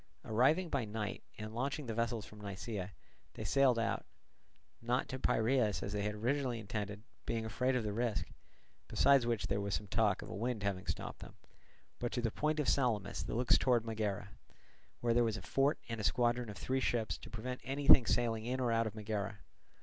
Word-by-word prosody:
Arriving 135 +11 +3
by 140 -6 0
night 105 -1 -4 0.2
and 110 0 -6
launching 135 +5 -2
the 115 - -3
vessels 115 -1 -1
from 105 0 -13
Nisaea, 100 -1 -5 0.4
they - - -5
sailed, 135 -3 +4 1.0
not 120 +2 0
to 130 - -4
Piraeus 115 -3 +2
as 100 - -4
they 105 - -1
had 105 +1 -1
originally 125 +2 0
intended, 105 -1 -4 0.2
being 115 -1 -1
afraid 125 +4 0
of 125 - +1
the 105 -1 -2
risk, 115 -2 0 0.6
besides 135 -4 +4
which 115 -3 0
there 100 +1 0
was 100 0 -1
some 105 - -3
talk 105 -1 +1
of - - -9
a - - -4
wind 115 0 -2
having 100 -2 -2
stopped - - -4
them, - - -11 0.6
but 120 - -2
to 125 - 0
the 115 - +1
point 155 +4 0
of 145 - 0
Salamis 115 -7 +1
that - - -4
looks 120 +1 +4
towards 120 -3 +3
Megara; 105 -3 -2 0.7
where 120 -1 +2
there 120 +1 +4
was 110 -2 0
a - - -8
fort 140 +3 +2
and 115 -1 -3
a - - -5
squadron 120 +1 +2
of 105 - -7
three 130 +1 0
ships 120 -3 0
to - - -10
prevent 125 +2 -5
anything 135 -2 +6
sailing 115 -2 +1
in 130 +1 -1
or 125 -2 +1
out 115 0 +2
of 110 - -6
Megara. 105 -1 -3
115 Hz, 200 wpm, -35 LUFS, 105-125 Hz, 1.0 s, anything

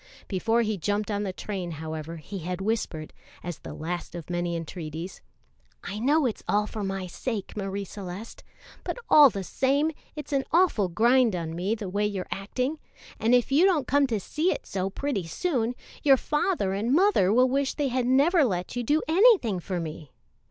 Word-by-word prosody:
Before 225 +4 +1
he 215 -3 -2
jumped 205 +4 -1
on 205 0 -1
the 200 -2 -2
train, 185 -3 -5
however, 160 +1 -6
he 190 +5 -7
had 180 +2 -4
whispered, 195 -7 -2 0.3
as 175 -3 -5
the - - -8
last 175 +2 -5
of 170 0 -7
many 175 0 -1
entreaties: 165 +1 -6 0.6
"I 200 +1 -5
know 290 +5 +3
it's 235 - -2
all 210 +1 +2
for 210 0 -5
my 195 -1 -3
sake, 205 +3 -5
Marie 200 -1 -3
Celeste, 195 +3 -8 0.4
but - - -4
all 295 -2 +9
the 200 -4 -5
same, 280 - +1 0.2
it's 300 -1 -6
an 275 -1 +2
awful 330 - +3
grind 235 +4 +3
on 165 -2 -4
me 190 +6 -1
the 210 -3 -6
way 205 +3 0
you're 195 -3 -4
acting; 255 +10 -2 0.4
and 225 +3 +4
if 245 +2 +1
you 295 +6 +5
don't 335 -8 +3
come 280 +2 +3
to 225 -4 -1
see 310 - 0
it - - -4
so 190 0 -2
pretty 200 - -3
soon, 245 - -1 0.3
your 275 -2 +6
father 295 - 0
and 225 +7 +1
mother 355 - +4
will 250 +4 +5
wish 270 +1 0
they 290 -3 0
had 250 -1 0
never 290 +6 +4
let 180 -6 -2
you 245 - -1
do 295 +6 +1
anything 335 - +4
for 180 +1 -3
me. 155 -3 -6
210 Hz, 190 wpm, -27 LUFS, 180-270 Hz, 0.6 s, all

